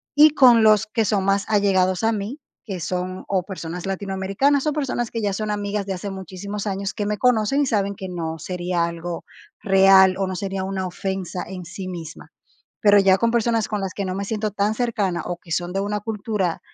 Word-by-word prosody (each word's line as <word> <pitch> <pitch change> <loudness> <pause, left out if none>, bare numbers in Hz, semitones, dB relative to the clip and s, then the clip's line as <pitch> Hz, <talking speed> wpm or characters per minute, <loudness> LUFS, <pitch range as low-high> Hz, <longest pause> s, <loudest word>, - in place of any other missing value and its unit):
Y 300 +1 +8
con 245 -6 +6
los 215 0 +5
que 220 0 0
son 195 -1 +1
más 195 0 +2
allegados 190 -3 +2
a 225 - +3
mí, 215 +8 -4 0.3
que 190 -5 -5
son, 180 +2 -4
o 185 -2 0
personas 180 -2 -6
latinoamericanas, 195 +8 0
son 305 -2 0
personas 255 -5 -2
que 230 - -3
ya 200 -2 0
son 215 +1 -2
amigas 205 -1 -2
de 195 - -3
hace 195 +2 -5
muchísimos 195 +2 -6
años, 195 0 -2
que 205 -2 -2
me 210 0 -1
conocen 250 +2 +3
y - - +2
saben 200 -3 0
que 190 -1 -7
no 165 -2 -4
sería 175 0 -1
algo 170 0 -5 0.4
real 190 -2 +6
o 195 - 0
no 185 - -4
sería 195 0 -3
una 190 -1 -3
ofensa 185 0 -4
en 185 -1 -7
sí 185 +3 -7
misma. 170 -3 -8 0.5
Pero 205 -1 +6
ya 190 -1 +5
con 230 0 +2
personas 230 -1 +1
con 210 -2 -2
las 190 -1 -4
que 200 - -3
no 185 0 -3
me 200 +1 -3
siento 215 0 -2
tan 210 +1 0
cercana 205 -8 -1
o 175 -1 -4
que 165 -2 -9
son 175 +2 -1
de 195 - -1
una 205 +1 -2
cultura 210 -4 -2
195 Hz, 215 wpm, -22 LUFS, 185-215 Hz, 0.5 s, Y